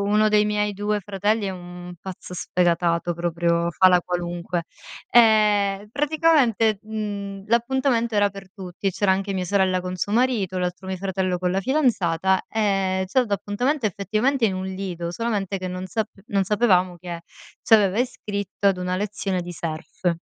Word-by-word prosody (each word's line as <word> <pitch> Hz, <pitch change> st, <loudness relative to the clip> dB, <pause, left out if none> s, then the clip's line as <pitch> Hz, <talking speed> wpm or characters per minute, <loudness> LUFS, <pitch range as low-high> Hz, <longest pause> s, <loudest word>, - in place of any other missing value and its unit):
1 210 Hz, +2 st, +3 dB
dei 210 Hz, 0 st, +4 dB
miei 210 Hz, 0 st, 0 dB
2 205 Hz, +1 st, -1 dB
fratelli 205 Hz, +2 st, -1 dB
è 195 Hz, -, -1 dB
un 180 Hz, -1 st, -9 dB
pazzo 185 Hz, -1 st, -9 dB
sfegatato 175 Hz, -1 st, +1 dB
proprio, 170 Hz, 0 st, 0 dB
fa 185 Hz, +3 st, +5 dB
la 180 Hz, -1 st, +4 dB
qualunque. 175 Hz, -1 st, -3 dB, 0.5 s
E 210 Hz, -3 st, +4 dB
praticamente, 285 Hz, -8 st, +2 dB
mhmm, 205 Hz, -2 st, -5 dB
l'appuntamento 235 Hz, 0 st, +1 dB
era 205 Hz, -1 st, +3 dB
per 195 Hz, -1 st, -11 dB
tutti 190 Hz, -1 st, -7 dB
e -, -, +4 dB
c'era 195 Hz, +1 st, +2 dB
anche 195 Hz, +1 st, -2 dB
mia 185 Hz, -, -1 dB
sorella 185 Hz, -1 st, +1 dB
con 180 Hz, 0 st, -4 dB
suo 185 Hz, +3 st, -2 dB
marito, 225 Hz, -6 st, +1 dB
l'altro 180 Hz, +1 st, -3 dB
mio 190 Hz, -, -3 dB
fratello 185 Hz, -1 st, -1 dB
con 180 Hz, 0 st, -1 dB
la 195 Hz, -, 0 dB
fidanzata 190 Hz, -, +1 dB
e 195 Hz, -3 st, 0 dB
c'ha 260 Hz, +8 st, +2 dB
dato 215 Hz, -5 st, 0 dB
appuntamento 245 Hz, +7 st, -1 dB
effettivamente 215 Hz, +6 st, +1 dB
in 195 Hz, -, -1 dB
un 185 Hz, 0 st, -4 dB
lido, 185 Hz, -3 st, -4 dB
solamente 200 Hz, -1 st, -2 dB
che 185 Hz, 0 st, -4 dB
non 185 Hz, +1 st, -5 dB
sap 220 Hz, +2 st, -2 dB, 0.2 s
non 195 Hz, -1 st, +1 dB
sapevamo 185 Hz, -4 st, +2 dB
che 175 Hz, -1 st, -7 dB, 0.4 s
c'aveva 210 Hz, -2 st, +4 dB
iscritto 205 Hz, -5 st, -1 dB
ad 190 Hz, -2 st, +1 dB
una 180 Hz, 0 st, -2 dB
lezione 195 Hz, -2 st, -2 dB
di 175 Hz, 0 st, -7 dB
surf. 170 Hz, +2 st, -3 dB
195 Hz, 165 wpm, -23 LUFS, 180-215 Hz, 0.5 s, fa